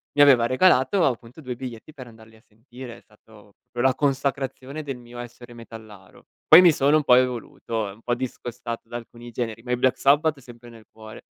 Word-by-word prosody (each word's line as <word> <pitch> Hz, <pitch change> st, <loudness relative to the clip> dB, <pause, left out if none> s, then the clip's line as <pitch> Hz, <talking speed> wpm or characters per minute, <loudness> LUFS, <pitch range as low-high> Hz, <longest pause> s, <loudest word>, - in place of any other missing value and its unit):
mi 145 Hz, -, +4 dB
aveva 130 Hz, -5 st, +6 dB
regalato 165 Hz, +5 st, +3 dB
appunto 120 Hz, +1 st, -4 dB
2 130 Hz, -5 st, -6 dB
biglietti 125 Hz, +3 st, -9 dB
per 130 Hz, -4 st, -11 dB
andarli 110 Hz, -1 st, -17 dB
a 110 Hz, -, -22 dB
sentire, 120 Hz, +2 st, -12 dB
è -, -, -18 dB
stato 105 Hz, -1 st, -21 dB, 0.2 s
proprio 120 Hz, 0 st, -3 dB
la 130 Hz, -1 st, +3 dB
consacrazione 140 Hz, +1 st, -2 dB
del 135 Hz, -3 st, -6 dB
mio 120 Hz, 0 st, -14 dB
essere 120 Hz, 0 st, -11 dB
metallaro. 110 Hz, -4 st, -14 dB, 0.2 s
Poi 160 Hz, -, +9 dB
mi 175 Hz, -3 st, +6 dB
sono 145 Hz, +2 st, +3 dB
un 155 Hz, -, -1 dB
po' 125 Hz, -, +6 dB
evoluto 120 Hz, -3 st, -2 dB
e -, -, -10 dB
un 105 Hz, -, -20 dB
po' 120 Hz, -, -2 dB
discostato 120 Hz, -2 st, -6 dB
da 120 Hz, -, -5 dB
alcuni 120 Hz, 0 st, -12 dB
generi, 115 Hz, -1 st, -5 dB
ma 125 Hz, -, -6 dB
i 125 Hz, -, +1 dB
Black 130 Hz, +1 st, +1 dB
Sabbath 145 Hz, +2 st, +2 dB
sempre 120 Hz, -2 st, -15 dB
nel 115 Hz, -1 st, -15 dB
cuore. 110 Hz, 0 st, -12 dB
120 Hz, 205 wpm, -23 LUFS, 115-135 Hz, 0.2 s, Poi